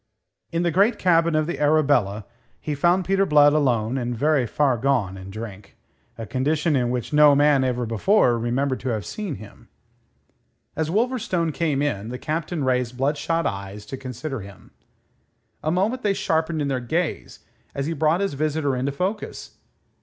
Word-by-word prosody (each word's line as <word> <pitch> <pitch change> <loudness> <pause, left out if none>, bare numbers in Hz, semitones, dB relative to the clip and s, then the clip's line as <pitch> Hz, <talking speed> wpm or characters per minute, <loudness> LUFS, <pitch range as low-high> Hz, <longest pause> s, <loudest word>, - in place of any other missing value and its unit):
In 170 +1 0
the 170 - +1
great 205 +6 +3
cabin 170 -2 +3
of 155 0 +2
the 155 -4 -4
Arabella 145 -9 +2 0.3
he 150 - -4
found 175 +5 +2
Peter 195 0 +2
Blood 145 -4 +5
alone 130 -4 +1
and 120 -1 -3
very 145 -1 +2
far 140 +1 +1
gone 120 -6 0
in 95 0 -9
drink 105 -1 -9 0.4
a 115 - -5
condition 150 +5 0
in 125 -2 +1
which 125 +3 -3
no 150 -1 +7
man 145 -1 +4
ever 125 -1 -1
before 120 - +2
remembered 130 +3 -1
to 130 - -4
have 110 -4 -2
seen 205 -8 -5
him. 100 +1 -14 1.1
As 160 0 -1
Wolverstone 215 -5 0
came 145 -4 0
in, 110 -7 -2
the 125 - -5
Captain 155 +2 -3
raised 125 -1 0
bloodshot 150 +5 0
eyes 100 +1 -5
to 105 - -6
consider 130 +1 -6
him. 100 -2 -13 0.9
A 155 - -1
moment 200 +9 0
they 205 -3 +1
sharpened 160 -2 0
in - - -1
their 135 -2 -1
gaze 160 +7 -3 0.3
as 140 - -2
he 165 - -2
brought 160 +4 +1
his 200 -4 -1
visitor 145 -1 -1
into 130 +3 -1
focus. 185 +9 -4
145 Hz, 170 wpm, -23 LUFS, 125-165 Hz, 1.1 s, no